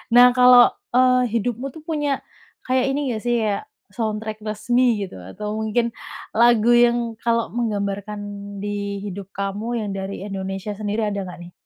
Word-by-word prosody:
Nah 245 Hz, 0 st, +9 dB
kalau, 250 Hz, -1 st, +8 dB, 0.3 s
eee, 255 Hz, 0 st, +5 dB
hidupmu 240 Hz, +3 st, -1 dB
tuh 320 Hz, -, -11 dB
punya 295 Hz, -4 st, -1 dB, 0.4 s
kayak 255 Hz, 0 st, +2 dB
ini 280 Hz, 0 st, -1 dB
nggak 220 Hz, -, -3 dB
sih 240 Hz, 0 st, +2 dB
ya, 215 Hz, -, -1 dB, 0.3 s
soundtrack 220 Hz, -1 st, -3 dB
resmi 225 Hz, +3 st, +1 dB
gitu, 180 Hz, -, -11 dB
atau 210 Hz, -, -5 dB
mungkin 230 Hz, +2 st, 0 dB, 0.4 s
lagu 235 Hz, 0 st, +5 dB
yang 240 Hz, 0 st, +5 dB, 0.2 s
kalau 230 Hz, -1 st, 0 dB
menggambarkan 205 Hz, -3 st, -2 dB, 0.4 s
di 200 Hz, 0 st, -3 dB
hidup 195 Hz, -1 st, -7 dB
kamu 210 Hz, +3 st, -3 dB
yang -, -, -4 dB
dari 195 Hz, 0 st, -5 dB
Indonesia 195 Hz, +1 st, -4 dB
sendiri 210 Hz, +1 st, -2 dB
ada 200 Hz, -1 st, -3 dB
nggak 180 Hz, -1 st, -9 dB
nih? -, -, -24 dB
220 Hz, 155 wpm, -22 LUFS, 200-240 Hz, 0.4 s, Nah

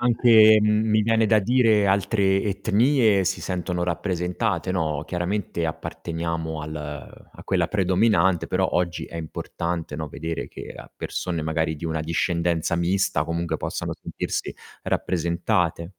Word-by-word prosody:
Anche, 115 Hz, -3 st, +6 dB
mi 110 Hz, +1 st, +2 dB
viene 115 Hz, +1 st, +2 dB
da 110 Hz, 0 st, +4 dB
dire, 110 Hz, -1 st, +3 dB
altre 95 Hz, 0 st, +2 dB
etnie 105 Hz, +1 st, +2 dB
si 95 Hz, +2 st, -1 dB
sentono 90 Hz, -1 st, -3 dB
rappresentate, 90 Hz, +2 st, -1 dB
no. 80 Hz, -5 st, -1 dB
Chiaramente 90 Hz, -1 st, -2 dB
apparteniamo 80 Hz, 0 st, -4 dB
al 75 Hz, -3 st, -8 dB
a -, -, -13 dB
quella 90 Hz, -3 st, +1 dB
predominante, 95 Hz, -2 st, +2 dB
però -, -, 0 dB
oggi 90 Hz, 0 st, -1 dB
è -, -, -9 dB
importante, 85 Hz, 0 st, -4 dB
no, 80 Hz, 0 st, -4 dB
vedere 80 Hz, +3 st, -5 dB
che -, -, -9 dB
a -, -, -11 dB
persone 85 Hz, -3 st, -3 dB
magari 80 Hz, 0 st, -1 dB
di 85 Hz, +3 st, -5 dB
una 80 Hz, -1 st, -2 dB
discendenza 85 Hz, +1 st, 0 dB
mista 95 Hz, +3 st, +1 dB
comunque 85 Hz, -1 st, -2 dB
possano -, -, -4 dB
sentirsi -, -, -4 dB, 0.3 s
rappresentate. 85 Hz, 0 st, -1 dB
90 Hz, 130 wpm, -24 LUFS, 85-105 Hz, 0.3 s, Anche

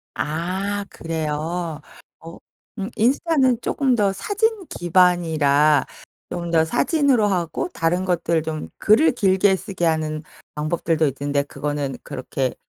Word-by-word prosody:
아 190 Hz, +6 st, -2 dB
그래요. 160 Hz, 0 st, -3 dB, 0.4 s
어 165 Hz, +1 st, -11 dB, 0.4 s
음 195 Hz, -, -3 dB
인스타는 260 Hz, 0 st, +2 dB
쪼끔 265 Hz, -1 st, +1 dB
더 200 Hz, -3 st, +2 dB
사진 420 Hz, -, -1 dB
기반이라 160 Hz, -5 st, +3 dB, 0.5 s
좀 170 Hz, -1 st, -4 dB
더 160 Hz, -1 st, +4 dB
사진으로 270 Hz, -, +2 dB
하고 180 Hz, -, -1 dB
다른 175 Hz, +3 st, 0 dB
것들 170 Hz, -2 st, +1 dB
좀 155 Hz, -1 st, -5 dB
글을 220 Hz, +10 st, +5 dB
길게 195 Hz, -3 st, +3 dB
쓰게 185 Hz, -2 st, -4 dB
하는 155 Hz, -1 st, 0 dB, 0.3 s
방법들도 155 Hz, +1 st, 0 dB
있던데 140 Hz, +1 st, -1 dB
그거는 145 Hz, -2 st, -4 dB
그렇게 130 Hz, 0 st, -3 dB
170 Hz, 250 characters per minute, -22 LUFS, 155-205 Hz, 0.5 s, 글을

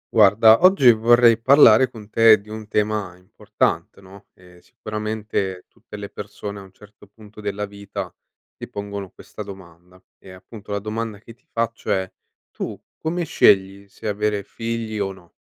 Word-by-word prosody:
Guarda, 110 Hz, +3 st, +6 dB
oggi 185 Hz, -10 st, +7 dB
vorrei 115 Hz, +1 st, +4 dB
parlare 130 Hz, -2 st, +6 dB
con 110 Hz, -4 st, -12 dB
te 115 Hz, -2 st, +6 dB
di 100 Hz, -, -21 dB
un 110 Hz, 0 st, -8 dB
tema 105 Hz, -4 st, -2 dB
importante, 90 Hz, +1 st, -3 dB
no, 95 Hz, 0 st, -16 dB
e 90 Hz, -1 st, -19 dB
sicuramente 105 Hz, -4 st, -5 dB
tutte 105 Hz, -, -13 dB
le 100 Hz, 0 st, -7 dB
persone, 105 Hz, 0 st, -8 dB
a -, -, -10 dB
un 95 Hz, -1 st, -15 dB
certo 105 Hz, +1 st, -19 dB
punto 105 Hz, +1 st, -15 dB
della 105 Hz, 0 st, -3 dB
vita, 100 Hz, -2 st, -8 dB, 0.4 s
ti -, -, -10 dB
pongono 100 Hz, -1 st, -6 dB
questa -, -, -12 dB
domanda, 90 Hz, -3 st, -12 dB, 0.2 s
ehm, 95 Hz, -1 st, -13 dB
appunto, 105 Hz, +2 st, -14 dB
la 100 Hz, -, -1 dB
domanda 110 Hz, +1 st, -5 dB
che 115 Hz, +3 st, -15 dB
ti 120 Hz, -, -34 dB
faccio 115 Hz, -1 st, -3 dB
è: 95 Hz, -2 st, 0 dB, 0.4 s
tu -, -, -6 dB, 0.2 s
come 170 Hz, +2 st, -2 dB
scegli 100 Hz, -8 st, +2 dB
se 110 Hz, -, -9 dB
avere 105 Hz, 0 st, -1 dB
figli, 115 Hz, 0 st, -5 dB
o 100 Hz, -1 st, -2 dB
no? 90 Hz, -2 st, -19 dB
105 Hz, 165 wpm, -21 LUFS, 100-110 Hz, 0.4 s, oggi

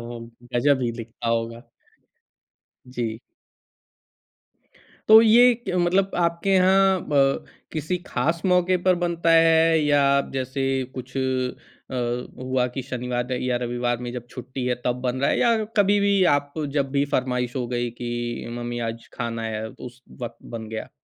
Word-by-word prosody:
वो, 120 Hz, 0 st, -7 dB, 0.3 s
गजब 135 Hz, +2 st, +3 dB
ही 120 Hz, -, 0 dB
लिखता 115 Hz, 0 st, -6 dB
होगा। 115 Hz, +1 st, -2 dB, 1.2 s
जी। 115 Hz, -3 st, -3 dB, 1.9 s
तो 220 Hz, +1 st, +10 dB
ये 240 Hz, +2 st, +6 dB
क -, -, -1 dB
मतलब 185 Hz, +3 st, +2 dB
आपके 170 Hz, +2 st, 0 dB
यहाँ 190 Hz, 0 st, +4 dB
ब 135 Hz, -2 st, +2 dB, 0.3 s
किसी 155 Hz, +3 st, -2 dB
ख़ास 165 Hz, +1 st, -1 dB
मौके 180 Hz, 0 st, +3 dB
पर 185 Hz, -, +6 dB
बनता 170 Hz, -1 st, 0 dB
है 165 Hz, 0 st, +5 dB
या 145 Hz, -1 st, +3 dB, 0.3 s
जैसे 130 Hz, +1 st, -2 dB, 0.3 s
कुछ 130 Hz, +1 st, -8 dB
अ, 125 Hz, -1 st, -3 dB, 0.2 s
हुआ 130 Hz, -1 st, 0 dB
कि 135 Hz, -, -3 dB
शनिवार 125 Hz, -1 st, -3 dB
र 125 Hz, -, -1 dB
या 125 Hz, -1 st, 0 dB
रविवार 120 Hz, 0 st, -1 dB
में 120 Hz, -, -5 dB
जब 120 Hz, -1 st, -7 dB
छुट्टी 125 Hz, +1 st, -6 dB
है, 125 Hz, -, +1 dB
तब 125 Hz, 0 st, -1 dB
बन 130 Hz, 0 st, -1 dB
रहा 140 Hz, -, +2 dB
है? -, -, +1 dB
या 230 Hz, -2 st, +3 dB
कभी-भी 200 Hz, -1 st, +3 dB
आप 145 Hz, 0 st, -2 dB, 0.3 s
जब 135 Hz, -1 st, 0 dB
भी 140 Hz, 0 st, +2 dB
फरमाइश 125 Hz, 0 st, -1 dB
हो 125 Hz, -, -1 dB
गई, 120 Hz, -1 st, -2 dB
कि 120 Hz, 0 st, -4 dB
मम्मी 120 Hz, 0 st, -4 dB
आज 115 Hz, 0 st, -11 dB
खाना 115 Hz, -1 st, -4 dB
है, 110 Hz, -1 st, -3 dB
उस 125 Hz, +2 st, -11 dB, 0.2 s
वक़्त 120 Hz, -1 st, -6 dB, 0.2 s
बन 110 Hz, -1 st, -6 dB
गया। 110 Hz, 0 st, -5 dB
130 Hz, 155 wpm, -24 LUFS, 120-165 Hz, 1.9 s, तो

